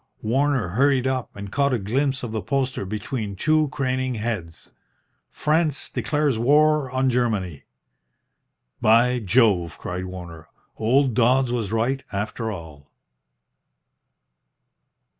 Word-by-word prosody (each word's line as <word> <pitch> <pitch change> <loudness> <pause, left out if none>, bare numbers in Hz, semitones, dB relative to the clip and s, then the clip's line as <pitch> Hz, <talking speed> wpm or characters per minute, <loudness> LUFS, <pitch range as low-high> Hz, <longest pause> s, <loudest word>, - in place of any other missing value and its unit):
Warner 130 -2 +1
hurried 130 +5 +2
up 130 -2 -2
and 100 -1 -8
caught 140 -1 +1
a - - 0
glimpse 130 +6 -1
of 120 - -4
the 110 -1 -2
poster 130 -6 -1
between 105 0 -4
two 155 +8 +2
craning 130 -2 -2
heads 105 -8 -5 0.6
"FRANCE 155 -2 0
DECLARES 130 +1 0
WAR 150 +2 +3
ON 130 +1 0
GERMANY." 110 - -1 1.2
"By 120 +3 +4
Jove!" 100 -6 +2
cried 90 +1 -5
Warner. 85 -3 -9 0.3
"Old 130 +3 +2
Dodds 125 +2 +3
was 115 -5 -2
right, 120 +4 0
after 110 +2 -3
all." 80 -7 -10
120 Hz, 115 wpm, -23 LUFS, 105-135 Hz, 1.2 s, By